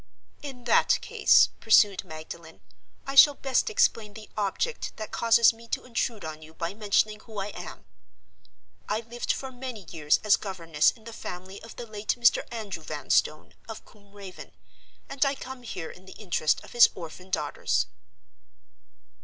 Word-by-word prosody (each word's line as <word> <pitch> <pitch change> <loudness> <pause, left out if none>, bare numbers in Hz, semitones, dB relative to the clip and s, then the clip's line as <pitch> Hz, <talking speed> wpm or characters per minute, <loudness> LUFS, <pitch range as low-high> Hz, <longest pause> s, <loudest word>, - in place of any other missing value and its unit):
"In 265 -4 -9
that 240 - +4
case," - - +4
pursued 210 -3 +4
Magdalen, 160 +1 -10 0.4
"I 275 - -4
shall 285 +1 +8
best 270 - 0
explain 215 - +1
the 220 -1 -11
object 215 - -2
that 215 -1 -6
causes 230 0 +5
me 230 +1 -15
to - - -3
intrude 230 -4 -2
on 155 0 -7
you 160 +1 -14
by 170 +1 -4
mentioning 210 0 +1
who 220 -1 -12
I 200 +1 -3
am. - - -9 1.0
I 215 +2 0
lived 235 +1 -3
for 265 -1 -4
many 250 -3 -7
years 155 -3 +1
as 210 -1 +5
governess 165 -6 +1
in 225 - -9
the 230 0 -9
family 185 0 -8
of 225 - -12
the 240 - -7
late 215 -1 -3
Mr. 235 - +5
Andrew 210 -7 -5
Vanstone, 155 0 -1 0.2
of 220 - -8
Combe 200 -2 -22
Raven, 195 -3 -11 0.5
and 275 +1 0
I 275 0 +1
come 260 -1 -9
here 180 -8 -6
in 185 - -16
the 190 - -10
interest 175 -7 0
of - - -14
his 240 -1 +7
orphan 180 +2 -10
daughters." 185 - 0
215 Hz, 165 wpm, -27 LUFS, 185-235 Hz, 1.0 s, shall